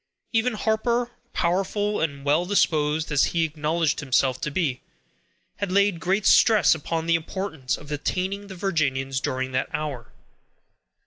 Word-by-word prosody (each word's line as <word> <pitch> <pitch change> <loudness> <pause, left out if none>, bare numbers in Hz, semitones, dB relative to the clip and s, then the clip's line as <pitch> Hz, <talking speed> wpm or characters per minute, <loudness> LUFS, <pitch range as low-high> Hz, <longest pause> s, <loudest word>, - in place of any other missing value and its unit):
Even 225 +2 +2
Harper, 235 +3 0 0.2
powerful 195 +4 0
and 140 -3 -3
well 150 +4 +3
disposed 155 -5 +1
as 145 -1 +4
he 165 - +3
acknowledged 155 0 -1
himself 130 -2 +1
to - - -1
be, 140 -5 -1 0.8
had 200 -2 -3
laid 200 -2 +3
great 190 +4 0
stress 220 -2 +6
upon 160 +1 -3
the 170 - +2
importance 165 -4 -2
of 145 - -13
detaining 185 +7 -2
the 190 - -9
Virginians 135 -8 -1
during 130 0 -2
that 130 0 -1
hour. 145 -6 -5
165 Hz, 140 wpm, -24 LUFS, 145-195 Hz, 0.8 s, stress